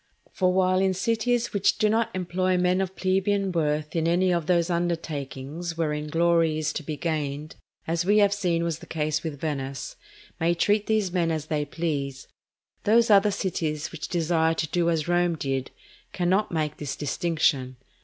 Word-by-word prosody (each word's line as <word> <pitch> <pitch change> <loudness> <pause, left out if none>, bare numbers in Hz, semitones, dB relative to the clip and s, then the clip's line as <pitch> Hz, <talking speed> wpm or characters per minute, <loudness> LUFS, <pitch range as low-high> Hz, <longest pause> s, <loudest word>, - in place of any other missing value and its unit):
For 185 -1 +1
while 185 +1 +2
cities 230 +4 0
which 200 -2 +2
do 215 - +3
not 225 +1 +1
employ 185 0 0
men 180 +1 +2
of 190 0 -3
plebeian 195 +1 +1
birth 150 -2 -1
in 165 -1 +1
any 180 +2 +3
of 170 -3 -1
those 175 -1 +2
undertakings 165 -1 -3
wherein 150 -2 -1
glory 165 0 +2
is 155 -1 -1
to - - -3
be 150 0 -5
gained, 150 -1 -3 0.3
as 165 +1 0
we 205 +4 +3
have 205 -1 +5
seen 175 -5 0
was 165 -2 -2
the - - -12
case 155 -1 -1
with 155 -4 -5
Venice, 135 -4 -4 0.4
may 170 +1 +2
treat 205 +4 +1
these 215 -4 +1
men 170 -3 +1
as 155 -2 -2
they 150 -2 -1
please, 145 -4 -3 0.6
those 225 +1 +4
other 205 +1 +6
cities 160 -6 -2
which 160 -2 -6
desire 165 -1 +1
to 160 - -1
do 170 -1 +1
as 160 -2 0
Rome 175 -1 +2
did, 135 -3 -2 0.4
cannot 190 +4 +1
make 155 -3 -1
this 145 -3 -4
distinction. 145 -3 0
170 Hz, 175 wpm, -26 LUFS, 155-185 Hz, 0.6 s, other